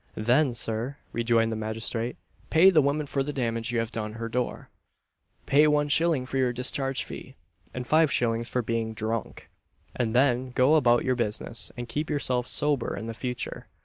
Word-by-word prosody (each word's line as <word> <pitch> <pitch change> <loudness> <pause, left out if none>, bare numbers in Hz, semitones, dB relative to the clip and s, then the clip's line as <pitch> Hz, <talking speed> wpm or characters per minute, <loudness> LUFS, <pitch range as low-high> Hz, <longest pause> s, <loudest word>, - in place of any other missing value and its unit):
"Then, 125 +4 +2
Sir," 115 +5 -3 0.2
rejoined 115 -1 +2
the - - -2
magistrate, 110 +2 -3 0.3
"pay 175 +4 +6
the 160 -4 +5
woman 145 +2 0
for 140 0 -2
the 140 +2 -2
damage 115 -3 -2
you 120 - -1
have 115 0 -1
done 110 -2 -4
her 115 +1 -5
door 125 +1 -3 0.7
pay 150 +2 +5
one 150 -1 +2
shilling 160 -3 +2
for 135 - -4
your 130 -2 +2
discharge 130 +2 0
fee, 130 - -10 0.4
and 125 -1 -5
five 155 +2 +3
shillings 115 0 0
for 125 - -1
being 115 0 -2
drunk; 110 +1 -4 0.5
and 120 -2 -1
then 125 -1 +2
go 130 +4 +4
about 120 -6 +4
your 130 - +2
business, 115 0 -2
and 120 0 -5
keep 150 +6 -3
yourself 130 -4 0
sober 145 -4 0
in 115 +3 -5
future." 125 +2 -5
125 Hz, 180 wpm, -27 LUFS, 115-140 Hz, 0.7 s, pay